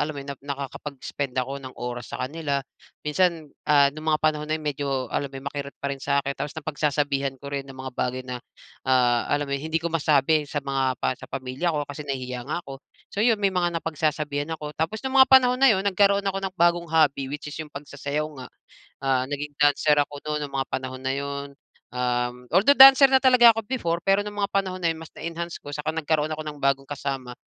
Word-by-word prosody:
alam 150 Hz, 0 st, -2 dB
mo 140 Hz, -, -6 dB
yun, 140 Hz, -, -5 dB
nakakapag-spend 140 Hz, -1 st, -5 dB
ako 135 Hz, +2 st, -2 dB
ng 130 Hz, -1 st, -9 dB
oras 120 Hz, -1 st, -5 dB
sa -, -, -5 dB
kanila. 140 Hz, -1 st, -2 dB, 0.4 s
Minsan, 160 Hz, -1 st, 0 dB, 0.2 s
ah, 140 Hz, -1 st, +5 dB
nung 155 Hz, +2 st, -6 dB
mga 155 Hz, -, +4 dB
panahon 150 Hz, -1 st, +1 dB
na 155 Hz, -, +1 dB
yun 155 Hz, -, -10 dB
medyo 145 Hz, -1 st, -2 dB, 0.2 s
alam 140 Hz, -, -1 dB
mo 135 Hz, -, -10 dB
'yon 135 Hz, -, -9 dB
makirot 140 Hz, -1 st, -6 dB
pa 140 Hz, 0 st, -3 dB
rin 135 Hz, -, -7 dB
sa'kin. 140 Hz, 0 st, 0 dB
Tapos 145 Hz, +2 st, -6 dB
napagsasabihan 145 Hz, -3 st, -1 dB
ko 140 Hz, +2 st, -9 dB
rin 140 Hz, -1 st, -4 dB
ng 135 Hz, -, -10 dB
mga 130 Hz, 0 st, -7 dB
bagay 125 Hz, +1 st, -2 dB
na, 125 Hz, -1 st, -6 dB, 0.5 s
ah, 125 Hz, -2 st, +3 dB
alam 145 Hz, 0 st, +1 dB
mo 140 Hz, -, -6 dB
hindi 155 Hz, +4 st, -2 dB
ko 165 Hz, 0 st, -2 dB
masabi 150 Hz, -1 st, +2 dB
sa 145 Hz, -1 st, -3 dB
mga 135 Hz, -2 st, 0 dB
pa -, -, 0 dB
sa 130 Hz, -, -12 dB
pamilya 130 Hz, +5 st, -3 dB
ko 145 Hz, -, -1 dB
kasi 145 Hz, +1 st, -8 dB
nahihiya 125 Hz, -2 st, -3 dB
nga 175 Hz, +3 st, -3 dB
ko. 135 Hz, -1 st, -9 dB, 0.3 s
So, 200 Hz, -, -2 dB
yun 225 Hz, 0 st, +4 dB
may 200 Hz, -2 st, +1 dB
mga 175 Hz, -2 st, 0 dB
napagsasabihan 150 Hz, -2 st, -2 dB
ako 150 Hz, -1 st, -7 dB
tapos 170 Hz, +11 st, -3 dB
nung 265 Hz, 0 st, +3 dB
mga 265 Hz, -, +8 dB
panahon 255 Hz, -1 st, +6 dB
na 270 Hz, -, +7 dB
yun 195 Hz, -4 st, +3 dB
nagkaroon 200 Hz, 0 st, +3 dB
ako 195 Hz, 0 st, -1 dB
ng 195 Hz, -1 st, -4 dB
bagong 170 Hz, -1 st, +2 dB
hobby 150 Hz, -4 st, +2 dB
which 145 Hz, +2 st, -6 dB
is -, -, -7 dB
yung 155 Hz, -, -7 dB
pagsasayaw 145 Hz, +1 st, -4 dB, 0.2 s
nga, 125 Hz, -, -7 dB, 0.5 s
ah, 135 Hz, -2 st, +1 dB
naging 145 Hz, +1 st, -5 dB
dancer 145 Hz, +1 st, +4 dB
ako 145 Hz, 0 st, 0 dB
nun 150 Hz, -1 st, -1 dB
nung 140 Hz, -, -8 dB
mga 135 Hz, -, -3 dB
panahon 130 Hz, 0 st, -4 dB
na 130 Hz, 0 st, -1 dB
yun. 140 Hz, 0 st, -4 dB, 0.5 s
Um, 125 Hz, 0 st, -2 dB
although 200 Hz, +11 st, +5 dB
dancer 270 Hz, 0 st, +10 dB
na 265 Hz, 0 st, +3 dB
talaga 245 Hz, -3 st, +7 dB
ako 225 Hz, -, -2 dB
before. 170 Hz, -10 st, -1 dB
Pero 195 Hz, +2 st, +2 dB
nung 210 Hz, -, -6 dB
mga 200 Hz, -, 0 dB
panahon 190 Hz, -2 st, -1 dB
na 170 Hz, -, +3 dB
yun 160 Hz, -, -4 dB
mas 160 Hz, -1 st, -12 dB
na-enhance 170 Hz, +1 st, -6 dB
ko 145 Hz, -, -8 dB
saka 150 Hz, +2 st, -3 dB
nagkaroon 155 Hz, -1 st, 0 dB
ako 155 Hz, -, -6 dB
ng 150 Hz, -1 st, -7 dB
bagong 140 Hz, 0 st, +1 dB
kasama, 135 Hz, -3 st, -4 dB
145 Hz, 220 wpm, -25 LUFS, 135-165 Hz, 0.5 s, dancer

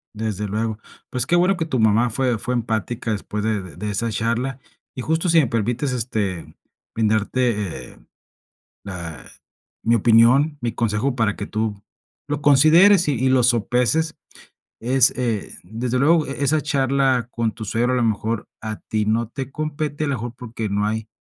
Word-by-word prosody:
Desde 105 Hz, -1 st, -3 dB
luego. 110 Hz, +1 st, -2 dB, 0.3 s
Pues 125 Hz, -1 st, -1 dB
qué 170 Hz, -, +2 dB
bueno 180 Hz, +3 st, +3 dB
que 160 Hz, -, -1 dB
tu 130 Hz, -6 st, -2 dB
mamá 110 Hz, +2 st, +3 dB
fue 125 Hz, 0 st, 0 dB
fue 125 Hz, -, -2 dB
empática 115 Hz, -1 st, -2 dB
después 105 Hz, 0 st, -3 dB
de 100 Hz, -7 st, -2 dB
de 105 Hz, +4 st, -4 dB
esa 115 Hz, +3 st, -1 dB
charla, 115 Hz, +4 st, -2 dB, 0.4 s
y 130 Hz, -, -4 dB
justo 160 Hz, +6 st, 0 dB
si 165 Hz, 0 st, +5 dB
me 145 Hz, -, +3 dB
permites, 115 Hz, +5 st, -1 dB
este, 105 Hz, -7 st, -3 dB, 0.4 s
brindarte, 105 Hz, -, 0 dB
eh, -, -, -19 dB, 0.8 s
la 85 Hz, -8 st, -7 dB, 0.6 s
mi 115 Hz, +1 st, +3 dB
opinión, 120 Hz, +7 st, +4 dB
mi 120 Hz, -2 st, -2 dB
consejo 115 Hz, +3 st, -1 dB
para 110 Hz, -4 st, +1 dB
que 100 Hz, -, -6 dB
tú 110 Hz, -1 st, -3 dB, 0.5 s
lo 145 Hz, 0 st, -2 dB
consideres 160 Hz, +7 st, +6 dB
y 145 Hz, -, +2 dB
y 130 Hz, +2 st, +1 dB
lo 130 Hz, -2 st, +3 dB
sopeses 125 Hz, +7 st, +1 dB, 0.6 s
es, 130 Hz, +2 st, +4 dB
eh, 115 Hz, -5 st, -2 dB
desde 115 Hz, +7 st, -3 dB
luego, 155 Hz, +3 st, +3 dB
e 140 Hz, +1 st, -3 dB
esa 150 Hz, +2 st, +2 dB
charla 135 Hz, -4 st, +1 dB
con 115 Hz, -2 st, -1 dB
tu 115 Hz, -, -8 dB
suegro, 120 Hz, +5 st, 0 dB
a -, -, +2 dB
lo 125 Hz, -, +1 dB
mejor, 110 Hz, 0 st, -1 dB
a 110 Hz, 0 st, -4 dB
ti 110 Hz, -1 st, -2 dB
no 110 Hz, +1 st, 0 dB
te 135 Hz, +1 st, -6 dB
compete, 155 Hz, 0 st, -3 dB
a -, -, 0 dB
lo 140 Hz, -, 0 dB
mejor, 120 Hz, -1 st, -5 dB
porque 115 Hz, -3 st, -5 dB
no 100 Hz, +1 st, 0 dB
hay 110 Hz, +1 st, -2 dB
120 Hz, 175 wpm, -21 LUFS, 110-135 Hz, 0.8 s, consideres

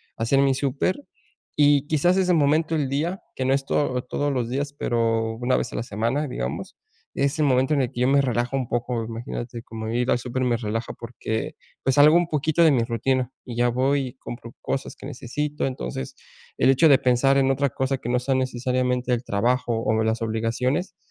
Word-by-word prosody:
hacer 115 Hz, +4 st, +1 dB
mi 135 Hz, -1 st, +4 dB
súper 140 Hz, +6 st, 0 dB, 0.6 s
y 145 Hz, -1 st, +4 dB
quizás 165 Hz, +4 st, +2 dB
ese 185 Hz, -1 st, +2 dB
momento 155 Hz, +1 st, +2 dB
el 145 Hz, -4 st, 0 dB
día, 160 Hz, +8 st, -2 dB
que 130 Hz, -, -2 dB
no 130 Hz, -, +2 dB
es 135 Hz, 0 st, 0 dB
todo 130 Hz, -4 st, 0 dB
todos 145 Hz, +3 st, -2 dB
los 120 Hz, -3 st, -1 dB
días, 140 Hz, +3 st, -2 dB
pero 115 Hz, -4 st, 0 dB
una 125 Hz, +2 st, +1 dB
vez -, -, -3 dB
a -, -, -5 dB
la -, -, -2 dB
semana, 115 Hz, +7 st, -1 dB
digamos, -, -, -5 dB, 0.4 s
es 140 Hz, +2 st, 0 dB
el 150 Hz, -, +3 dB
momento 130 Hz, +1 st, +2 dB
en 140 Hz, -, +2 dB
el 125 Hz, -, -1 dB
que 120 Hz, -, -7 dB
yo 125 Hz, -, +3 dB
me 140 Hz, +1 st, +4 dB
relajo 125 Hz, 0 st, -1 dB
un 130 Hz, -3 st, -2 dB
poco, 120 Hz, -1 st, -1 dB
imagínate, 115 Hz, +1 st, -6 dB
como 110 Hz, -1 st, -6 dB
ir 120 Hz, +2 st, 0 dB
al -, -, +4 dB
súper 125 Hz, +1 st, -2 dB
me 120 Hz, -1 st, +2 dB
relaja 115 Hz, 0 st, -3 dB
porque 115 Hz, -1 st, -5 dB, 0.3 s
pues 135 Hz, -1 st, +2 dB
salgo 150 Hz, +2 st, +7 dB
un 175 Hz, -1 st, +3 dB
poquito 155 Hz, +2 st, +2 dB
de 160 Hz, -, +6 dB
mi 125 Hz, -4 st, +2 dB
rutina 125 Hz, +2 st, 0 dB
y 120 Hz, -2 st, -8 dB
ya 120 Hz, 0 st, +3 dB
voy 130 Hz, +4 st, +1 dB
y 125 Hz, -, -9 dB
compro 120 Hz, -2 st, -9 dB
cosas 135 Hz, -, -3 dB
que -, -, -12 dB
necesito. 150 Hz, +2 st, -3 dB
Entonces 65 Hz, -, -5 dB, 0.4 s
el 130 Hz, -, +4 dB
hecho 135 Hz, +5 st, +5 dB
de 140 Hz, -, +7 dB
pensar 130 Hz, +2 st, +3 dB
en 135 Hz, 0 st, +3 dB
otra 140 Hz, +1 st, +1 dB
cosa 130 Hz, +2 st, -1 dB
que 120 Hz, -, -8 dB
no 125 Hz, +1 st, +2 dB
sea 135 Hz, +2 st, -1 dB
necesariamente 125 Hz, 0 st, 0 dB
el 120 Hz, 0 st, -2 dB
trabajo 120 Hz, +4 st, 0 dB
o 110 Hz, 0 st, +1 dB
las 110 Hz, +1 st, 0 dB
obligaciones, 115 Hz, -, -1 dB
130 Hz, 210 wpm, -24 LUFS, 120-140 Hz, 0.6 s, salgo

